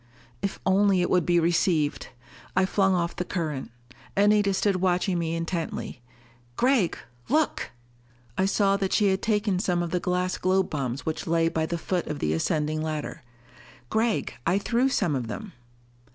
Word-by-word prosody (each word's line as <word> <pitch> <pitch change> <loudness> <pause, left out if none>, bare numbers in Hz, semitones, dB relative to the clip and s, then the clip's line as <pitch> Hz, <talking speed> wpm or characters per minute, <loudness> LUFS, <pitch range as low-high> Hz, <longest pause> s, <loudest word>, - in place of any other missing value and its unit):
_ - - -31 0.4
If 200 0 -3
only 195 -1 +4
it 175 - 0
would 180 -3 +2
be 175 -1 +4
received! 165 -2 +1 0.5
I 190 0 +4
flung 190 0 +2
off 170 -1 -1
the 180 - -2
current. 155 -7 -3 0.5
Anita 205 0 +4
stood 195 0 +1
watching 180 0 +1
me 165 0 -1
intently. 165 -6 -4 0.5
"Gregg, 245 -8 +2 0.3
look!" 310 +3 +1 0.7
I 190 - +2
saw 195 0 +2
that 195 -1 -1
she 205 -2 +4
had 190 0 0
taken 210 -3 +1
some 180 -3 0
of 170 - -4
the 180 - +1
glass 180 +1 -1
globe 185 0 +1
bombs 135 -3 -3
which 160 0 -3
lay 165 0 +2
by 160 -1 -1
the 170 - -2
foot 175 +1 -2
of 150 - -3
the 75 - 0
ascending 155 - 0
ladder. 155 -1 -4 0.7
"Gregg, 220 - 0
I 185 - +2
threw 240 +6 +1
some 195 - +1
of 125 -3 -2
them." 210 - -7
180 Hz, 170 wpm, -26 LUFS, 165-195 Hz, 0.7 s, only